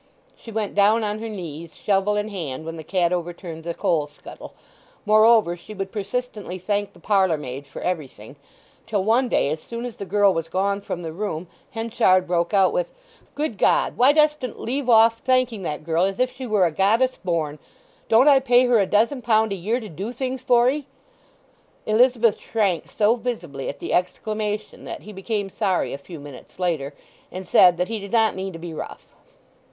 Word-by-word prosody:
She 230 - -12
went 215 -2 -2
down 210 +3 +4
on 210 0 -2
her 225 0 -5
knees, 170 -5 -8
shovel 200 +1 +1
in 210 +1 -1
hand, 160 -8 -5
when 165 0 -5
the 160 - -8
cat 180 0 +1
overturned 170 -1 -5
the 170 0 -4
coal 155 -4 0
scuttle; 145 - -12 0.5
moreover, 215 -3 +5
she 195 +5 -12
would 195 -1 -4
persistently 210 -2 -4
thank 205 +2 -2
the 175 - -18
parlour 190 -3 +2
maid 140 0 -7
for 135 - -9
everything, 145 -9 -5 0.5
till 205 -4 0
one 240 +5 +2
day, 140 - +2
as 155 0 -3
soon 235 +1 -6
as 245 - -7
the 200 - -6
girl 200 +1 +3
was 165 -1 -3
gone 200 +3 -1
from 175 -3 -5
the 160 -1 -5
room, 180 -3 -4 0.2
Henchard 225 -6 +2
broke 175 -1 0
out 200 - +3
with, - - -2 0.4
"Good 285 -9 -3
God, - - +2
why 255 +3 +6
dostn't 300 -4 +1
leave 260 +2 -3
off 230 0 +6
thanking 255 -4 +1
that 150 -4 -4
girl 165 +2 +1
as 195 0 -2
if 255 0 0
she 260 -1 -6
were 210 -4 +3
a 170 - +1
goddess 225 +10 +2
born! 160 -5 -2 0.5
Don't 235 +5 +5
I 280 -2 +7
pay 250 -1 +4
her 245 -2 +4
a 195 - +2
dozen 230 +7 +2
pound 220 -3 +2
a - - -2
year 210 +7 -1
to 220 - -8
do 195 +6 -6
things 255 +1 -4
for 245 -2 +4
'ee?" 285 +1 -1 1.0
Elizabeth 230 0 +3
shrank 195 -8 -1
so 215 +2 +2
visibly 220 - -4
at 140 - -6
the - - -4
exclamation 210 +3 -2
that - - -7
he 210 - -10
became 200 0 -3
sorry 190 -3 0
a 140 - -5
few 160 +3 -10
minutes 140 -3 -12
after, 155 -6 -1 0.4
and 185 0 -7
said 180 -1 +6
that 180 +1 0
he 225 +1 -3
did 200 0 -9
not 225 -2 +3
mean 190 0 -5
to 165 - -8
be 165 0 -7
rough. - - -7
205 Hz, 200 wpm, -23 LUFS, 175-230 Hz, 1.0 s, I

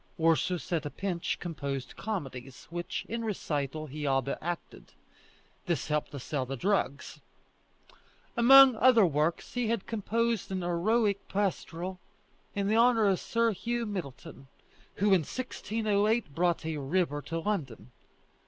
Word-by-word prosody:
Ursus 165 +3 +1
at 165 - +1
a 145 - -4
pinch 180 0 -3
composed 140 -6 -5
comedies, 135 - -6
which, 175 0 -4
in 230 +1 -3
recital, 155 -8 -3
he 150 0 -5
all 135 -1 +2
but 140 - -4
acted; 175 +1 -6 0.7
this 170 -2 -1
helped 150 0 0
to 140 - -7
sell 135 +1 -2
the 135 +1 -5
drugs. 185 - -1 1.2
Among 265 +1 +8
other 235 -3 +6
works, 155 +1 0
he 245 -2 0
had 230 -3 -1
composed 230 0 -1
an 185 -1 -2
heroic 200 +4 +1
pastoral 185 -2 -2 0.6
in 200 +1 0
honour 230 -1 +5
of 195 -2 +3
Sir 230 0 +1
Hugh 235 +3 -2
Middleton, 155 - -7 0.5
who 200 0 +3
in 185 - +5
1608 215 - -1
brought 170 0 +1
a 160 -1 -2
river 145 +1 0
to 165 +4 -4
London. 145 - -3
180 Hz, 135 wpm, -30 LUFS, 150-215 Hz, 1.2 s, Among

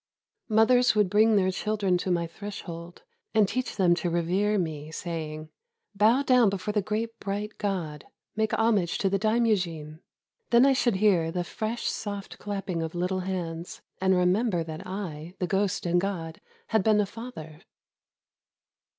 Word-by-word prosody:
Mothers 225 +2 +4
would 205 -3 +2
bring 215 +1 +5
their 190 -2 +3
children 205 -1 0
to 185 - -3
my 170 -1 +1
threshold, 170 -2 -8 0.3
and 215 -2 +5
teach 255 +4 -3
them 180 -4 +4
to 175 0 -1
revere 185 +5 +1
me, 155 -4 -3
saying, 155 -2 -5 0.2
" 465 - -57
Bow 225 +7 +4
down 250 -5 +5
before 195 +1 -3
the 210 0 +1
great 220 +3 -3
bright 205 +2 -4
God; 170 -8 -3 0.3
make 220 0 0
homage 210 -6 +2
to 195 - 0
the 195 - +1
Daimyojin." 185 -9 0 0.5
Then 240 +2 +6
I 275 - +5
should 240 -4 +2
hear 190 -5 +3
the 180 +1 -1
fresh 220 +6 -4
soft 200 -2 -4
clapping 195 -4 -3
of 160 +1 -4
little 180 +2 -1
hands, 175 -2 -5 0.2
and 190 0 +3
remember 180 +1 +2
that 160 +2 -7
I, 180 -3 -6
the 180 - -1
ghost 195 +1 0
and 175 0 +2
god, 170 -5 -4 0.3
had 220 -3 +2
been 215 0 +4
a 210 - +3
father. 190 -8 -9
195 Hz, 160 wpm, -27 LUFS, 170-215 Hz, 0.5 s, Then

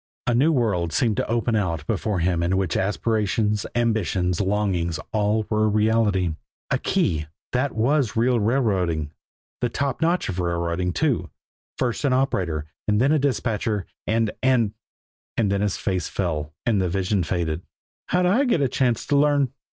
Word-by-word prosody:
A 120 - +2
new 140 +7 +4
world 100 - +1
seemed 110 +5 +1
to - - 0
open 115 0 +1
out 85 -7 -1
before 100 -1 -1
him 85 -1 +1
in 90 +2 +1
which 95 -4 0
aspirations, 105 0 0
ambitions, 95 -6 +1
longings 95 -5 0
all 105 0 +1
were 110 0 +1
a - - +3
reality. 105 -4 +2 0.4
A - - +2
key! 75 -2 0 0.2
That 130 +3 0
was 125 +1 +1
real 120 +1 +3
railroading, 95 - +1 0.5
the 120 - 0
top 140 +1 -2
notch 170 +2 +1
of 95 -1 -3
railroading, 85 0 -1
too. 125 - 0 0.5
First 120 +2 -1
an 140 -3 +2
operator, 90 - 0 0.2
and 105 0 +2
then 135 +4 +3
a 155 - +3
dispatcher, 110 -7 -1 0.2
and 110 0 +1
and 125 -5 +2 0.6
and 105 -4 +2
then 100 0 +1
his 105 -2 0
face 95 -4 -2
fell, 75 -5 -2
and 110 -5 +2
the 90 - 0
vision 95 +2 0
faded. 85 -1 -1 0.5
"How'd 180 0 +2
I 220 +11 +3
get 235 -10 +2
a 135 - +3
chance 125 -2 0
to 145 - +1
learn?" 140 -2 +3
105 Hz, 165 wpm, -23 LUFS, 90-120 Hz, 0.6 s, new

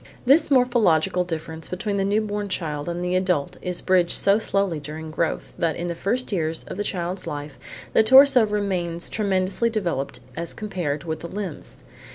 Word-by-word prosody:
This 280 +6 +5
morphological 215 - +3
difference 160 -2 -5
between 200 +2 -3
the 195 - +1
new 205 +2 +2
born 205 -1 -3
child 155 -4 -3
and 175 +1 -3
the 180 +1 0
adult 180 -6 0
is 180 -1 -3
bridged 180 -2 +3
so 200 +2 +3
slowly 195 -6 0
during 155 +2 -7
growth 165 +1 -2
that 165 -2 +1
in 175 +1 -3
the - - -1
first 225 +9 -2
years 160 -4 -1
of - - -8
the 205 - -1
child's 180 -1 -4
life 145 -1 -6 0.3
the - - +6
torso 260 0 +7
still 210 - -2
remains 175 -4 -2
tremendously 200 +2 0
developed 175 -11 -2 0.2
as 170 0 -4
compared 175 -9 -3
with 160 -1 -4
the 170 - -6
limbs. 190 -3 -7
180 Hz, 185 wpm, -24 LUFS, 165-205 Hz, 0.3 s, torso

